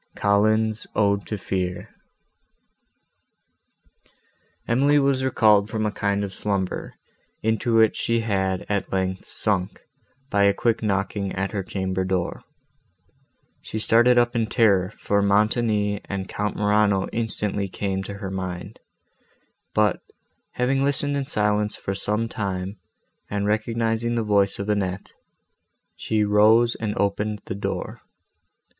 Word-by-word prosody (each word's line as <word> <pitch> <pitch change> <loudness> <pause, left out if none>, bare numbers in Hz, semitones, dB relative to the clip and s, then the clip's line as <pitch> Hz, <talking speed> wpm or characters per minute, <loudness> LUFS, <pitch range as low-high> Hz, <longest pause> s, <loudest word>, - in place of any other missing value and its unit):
COLLINS' 110 +2 +2
ODE 100 -1 +1
TO 105 - -3
FEAR 90 -2 -3 2.8
Emily 140 +5 +3
was 135 -2 +2
recalled 105 -5 +4
from 110 0 -2
a 105 - 0
kind 100 0 -1
of 100 -1 -5
slumber, 100 -3 -2 0.5
into 110 +1 +1
which 110 -1 +4
she 115 0 0
had, 95 -4 -1
at 100 -1 -2
length, 95 -1 -2
sunk, 95 -4 -1 0.5
by 100 - +2
a 100 0 +3
quick 115 +1 0
knocking 100 -1 -1
at 95 +1 -2
her 105 - -2
chamber 95 0 -2
door. 95 -2 -2 1.2
She - - -6
started 120 +3 +4
up 120 0 +3
in 115 -2 +1
terror, 100 -6 +3
for 100 -1 -1
Montoni 105 0 +1
and 95 -1 -4
Count 105 0 -3
Morano 105 -2 +2
instantly 105 -3 -2
came 95 0 -3
to 100 - -6
her 100 -1 -6
mind; 90 -2 -5 1.0
but, 105 -1 +2 0.5
having 135 +2 +1
listened 145 +1 +1
in 140 -1 -2
silence 105 -5 0
for 95 - -4
some 105 +3 -1
time, 100 -3 -4 0.5
and 100 0 -2
recognising 115 +2 0
the 115 - 0
voice 100 -2 +2
of 100 - -4
Annette, 100 -3 -2 0.8
she 110 -1 0
rose 110 +3 +4
and 105 -2 -4
opened 105 +1 -1
the - - -4
door. 100 - -4
105 Hz, 130 wpm, -24 LUFS, 100-110 Hz, 2.8 s, recalled